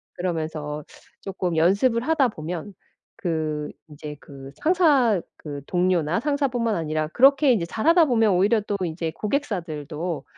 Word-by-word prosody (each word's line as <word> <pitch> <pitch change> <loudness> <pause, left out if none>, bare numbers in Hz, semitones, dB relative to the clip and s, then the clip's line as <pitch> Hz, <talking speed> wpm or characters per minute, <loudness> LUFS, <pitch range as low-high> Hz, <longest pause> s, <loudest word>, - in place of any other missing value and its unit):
'그러면서 155 -4 -3 0.4
쪼끔 185 -3 -3
연습을 200 +8 +3
하다 295 -6 +3
보면 175 +1 -6 0.4
그 155 -3 -2 0.2
인제 150 0 -9
그 135 -1 -11
상사 290 - +3 0.2
그 145 -2 -7
동료나 180 -2 +1
상사 285 0 +1
뿐만 230 -3 -1
아니라 155 -2 -2
그렇게 270 - +5
이제 190 -8 0
잘하다 325 - +4
보면 225 -6 +3
오히려 205 +5 +3
또 205 0 -3
이제 160 0 -3
고객사들도 170 - -3
180 Hz, 295 characters per minute, -24 LUFS, 155-235 Hz, 0.4 s, 그렇게